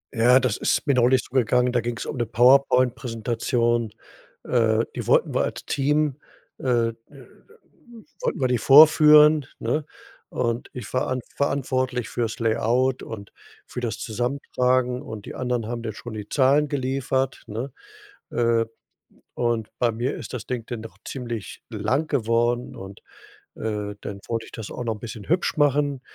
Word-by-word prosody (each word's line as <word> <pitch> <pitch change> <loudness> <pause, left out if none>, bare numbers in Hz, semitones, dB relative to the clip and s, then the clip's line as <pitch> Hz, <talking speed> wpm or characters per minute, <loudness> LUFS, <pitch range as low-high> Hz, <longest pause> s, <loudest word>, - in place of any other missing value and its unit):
Ja, 125 +3 +6
das 125 -5 0
ist - - 0
mir 140 - +3
neulich 125 0 +3
so - - -17
gegangen, 125 0 +3
da 120 -1 +1
ging's 120 +1 -4
um - - -5
'ne 120 -2 -1
Powerpoint-Präsentation, 120 -2 +2 0.5
äh, 115 -2 +2
die - - -5
wollten - - +3
wir - - +2
als - - -5
Team 145 0 +1 0.4
äh, 120 -3 +1
äh, - - -7 1.3
wollten - - -1
wir 130 - +3
die 125 -1 +1
vorführen, 150 +1 +7
ne, 155 -1 -1 0.4
und 115 0 -2
ich 105 -6 -8
war 130 - 0
an 130 - -1 0.2
verantwortlich 130 -3 -1
für's 115 -2 -2
Layout 120 +3 +1
und 100 -3 -8 0.3
für - - -7
das 115 -3 -3
Zusammentragen 125 +1 0
und 110 -2 -8
die - - -7
anderen 125 -3 -2
haben 120 0 -4
dann 110 -2 -4
schon 120 +1 -9
die 105 -1 -7
Zahlen 145 +2 +3
geliefert, 135 -1 -1
ne? 115 +6 -5 0.6
Äh, 115 -1 +2 0.7
und 115 -3 -1
bei 120 -1 +2
mir 120 +4 -2
ist - - -8
das 120 -4 -6
Ding 120 -3 -3
dann 120 -3 -5
doch 115 - -11
ziemlich 120 -5 -6
lang 120 +8 -1
geworden 120 -2 0
und, 95 +1 -10 0.6
äh, 105 -2 -3
dann 100 -1 -7
wollte 115 -1 -2
ich - - -15
das 110 -3 -7
auch 125 - -5
noch 115 - -1
'n - - -15
bisschen 110 -2 -8
hübsch 175 +3 +1
machen, 145 -2 +2
120 Hz, 160 wpm, -24 LUFS, 115-130 Hz, 1.3 s, vorführen